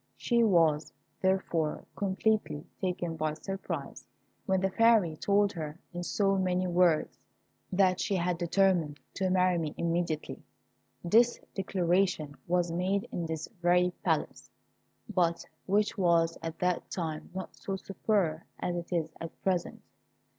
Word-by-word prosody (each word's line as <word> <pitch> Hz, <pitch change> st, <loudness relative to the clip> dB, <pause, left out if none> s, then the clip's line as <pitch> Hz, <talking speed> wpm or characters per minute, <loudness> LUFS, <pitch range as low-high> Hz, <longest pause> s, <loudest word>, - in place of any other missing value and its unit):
She 235 Hz, -1 st, +2 dB
was, 165 Hz, -7 st, +3 dB, 0.3 s
therefore, 185 Hz, -5 st, 0 dB
completely 200 Hz, -5 st, 0 dB, 0.2 s
taken 180 Hz, -3 st, -2 dB
by 155 Hz, -1 st, -1 dB
surprise 195 Hz, +4 st, -6 dB, 0.4 s
when 190 Hz, -1 st, +3 dB
the 190 Hz, 0 st, 0 dB
Fairy 225 Hz, -7 st, +4 dB
told 200 Hz, +4 st, +2 dB
her, 155 Hz, -2 st, -6 dB
in 175 Hz, -, -4 dB
so 195 Hz, +2 st, +1 dB
many 185 Hz, 0 st, +1 dB
words, 175 Hz, -3 st, +2 dB, 0.5 s
that 185 Hz, -1 st, +3 dB
she 200 Hz, -, 0 dB
had 175 Hz, -1 st, 0 dB
determined 175 Hz, -4 st, +2 dB
to 190 Hz, -1 st, 0 dB
marry 185 Hz, -1 st, +3 dB
me 155 Hz, -2 st, -3 dB
immediately. 170 Hz, -2 st, -2 dB, 0.6 s
This 235 Hz, +7 st, +4 dB
declaration 180 Hz, -5 st, 0 dB
was 175 Hz, -1 st, +1 dB
made 190 Hz, +6 st, 0 dB
in 170 Hz, -2 st, -3 dB
this 160 Hz, -1 st, -4 dB
very 180 Hz, +1 st, +3 dB
Palace, -, -, -1 dB, 0.6 s
but 170 Hz, -5 st, +1 dB, 0.2 s
which 205 Hz, +2 st, +1 dB
was 170 Hz, -2 st, +3 dB
at 165 Hz, 0 st, -5 dB
that 180 Hz, -1 st, -1 dB
time 160 Hz, -4 st, -4 dB
not 190 Hz, -, -6 dB
so 195 Hz, -, -4 dB
superb 190 Hz, -4 st, 0 dB, 0.2 s
as 175 Hz, -, -2 dB
it 170 Hz, +1 st, -6 dB
is 160 Hz, -2 st, -1 dB
at 165 Hz, 0 st, -7 dB
present. 185 Hz, -3 st, -1 dB
180 Hz, 135 wpm, -30 LUFS, 165-195 Hz, 0.6 s, Fairy